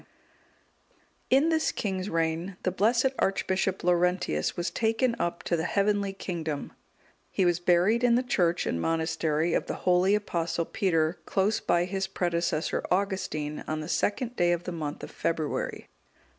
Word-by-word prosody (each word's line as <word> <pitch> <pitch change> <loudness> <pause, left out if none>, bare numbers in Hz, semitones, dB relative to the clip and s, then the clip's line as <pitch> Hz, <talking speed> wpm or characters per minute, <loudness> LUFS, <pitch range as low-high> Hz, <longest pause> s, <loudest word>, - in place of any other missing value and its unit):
D.] 260 - +6
In 305 +4 +3
this 320 -1 +2
king's 190 -1 -3
reign, 165 +3 -1
the 185 - +1
blessed 230 +7 +2
Archbishop 190 -1 0
Laurentius 180 - +1
was 175 0 -1
taken 230 +2 +1
up 170 0 -2
to 170 - 0
the 160 - -1
heavenly 200 0 +1
kingdom: 165 -6 -4 0.6
he 190 - +1
was 175 -1 +2
buried 180 +7 +3
in 240 -1 +5
the 250 - +2
church 175 -8 +1
and 85 - -1
monastery 160 - 0
of - - 0
the - - -3
holy 185 +2 +4
Apostle 170 -5 -1
Peter, 165 -3 0
close 200 +3 +1
by 175 0 +1
his 190 +1 -2
predecessor 170 -4 -1
Augustine, 180 -6 -1
on 155 0 -2
the - - -5
2nd 235 - -1
day 175 -3 +3
of 175 0 -2
the 180 - -4
month 155 -4 -5
of - - -7
February. 160 -3 -2
180 Hz, 155 wpm, -28 LUFS, 165-200 Hz, 0.6 s, D